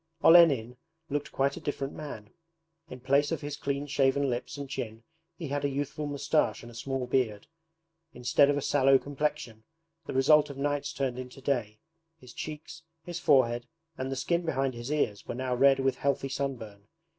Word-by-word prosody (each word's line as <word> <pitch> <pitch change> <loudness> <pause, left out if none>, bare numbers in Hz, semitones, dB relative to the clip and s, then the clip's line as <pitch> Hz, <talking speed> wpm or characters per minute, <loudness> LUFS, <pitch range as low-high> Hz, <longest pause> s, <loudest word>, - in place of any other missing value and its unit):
Olenin 140 -9 +6 0.3
looked 145 0 -2
quite 140 +1 0
a - - -8
different 140 -2 -3
man. 115 -8 -8 0.6
In 130 -1 -9
place 140 +3 +2
of 165 - -2
his 145 -1 -4
clean 140 0 -3
shaven 140 -1 +2
lips 120 +4 -4
and 140 -1 -5
chin 115 -4 -5 0.3
he 160 -5 -6
had 145 +1 -2
a 140 - +1
youthful 145 +2 -3
moustache 145 0 0
and 120 - -10
a - - -14
small 130 +2 -3
beard. 125 -5 0 0.7
Instead 125 +2 +3
of 145 - +2
a 145 - -2
sallow 135 -1 +4
complexion, 140 -5 -3 0.4
the - - -4
result 145 +3 +5
of 140 - -8
nights 145 0 -1
turned 130 -2 -2
into 125 +1 -8
day, 120 -6 -1 0.4
his 125 -6 -14
cheeks, 155 +1 -7 0.2
his 175 -1 -5
forehead, 125 -6 +3 0.3
and 130 -1 -4
the - - -1
skin 170 +6 0
behind 135 -5 0
his 120 +2 -7
ears 115 -9 -1
were - - -4
now 130 0 -2
red 135 +2 +5
with 135 -1 +1
healthy 140 -1 0
sunburn. 115 -8 -5
135 Hz, 180 wpm, -29 LUFS, 125-145 Hz, 0.7 s, Olenin